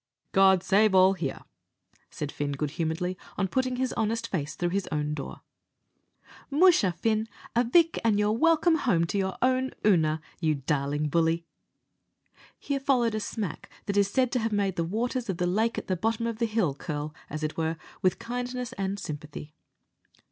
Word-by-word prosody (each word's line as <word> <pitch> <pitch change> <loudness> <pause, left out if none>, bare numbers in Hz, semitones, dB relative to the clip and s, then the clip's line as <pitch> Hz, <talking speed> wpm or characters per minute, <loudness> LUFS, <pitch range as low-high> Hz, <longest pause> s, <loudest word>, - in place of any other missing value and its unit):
"God 190 -2 +5
save 205 +1 +4
all 185 +1 +6
here!" 165 -8 -4 0.7
said 150 -1 -5
Fin, 145 -1 -3
good 145 +1 -2
humouredly, 170 +3 -2 0.2
on 195 - +1
putting 255 +4 0
his 255 0 -1
honest 230 +1 -1
face 155 -8 -3
into 175 - -1
his 195 +2 -2
own 150 -1 -1
door. 145 -2 -6 1.1
"Musha, 300 - +5
Fin, 220 +4 0 0.3
avick, 320 +8 +4
an' 220 -3 +3
you're 210 0 +2
welcome 325 +6 +3
home 185 - +2
to 200 +4 -1
your 190 -1 -2
own 260 0 +2 0.2
Oonagh, 160 -6 +3 0.2
you 155 -3 +1
darlin' 145 +1 -1
bully." 165 +2 +1 1.1
Here 280 -1 -2
followed 250 -4 +2
a 215 - -1
smack 205 -5 -5 0.2
that 200 - -2
is 200 -1 +3
said 255 +3 +1
to 255 - +1
have 225 0 -1
made 200 -3 0
the 170 - 0
waters 235 +6 -2
of 185 - -1
the 180 - 0
lake 220 +6 +1
at - - -3
the 185 - 0
bottom 225 +5 -1
of 230 -1 -3
the 230 - +1
hill 215 -9 +1
curl, 150 +1 -5 0.2
as 155 +1 -5
it 155 - -2
were, 160 0 -1 0.2
with 185 - +2
kindness 245 +1 -4
and 195 0 -2
sympathy. 150 -2 -7
195 Hz, 175 wpm, -27 LUFS, 165-230 Hz, 1.1 s, all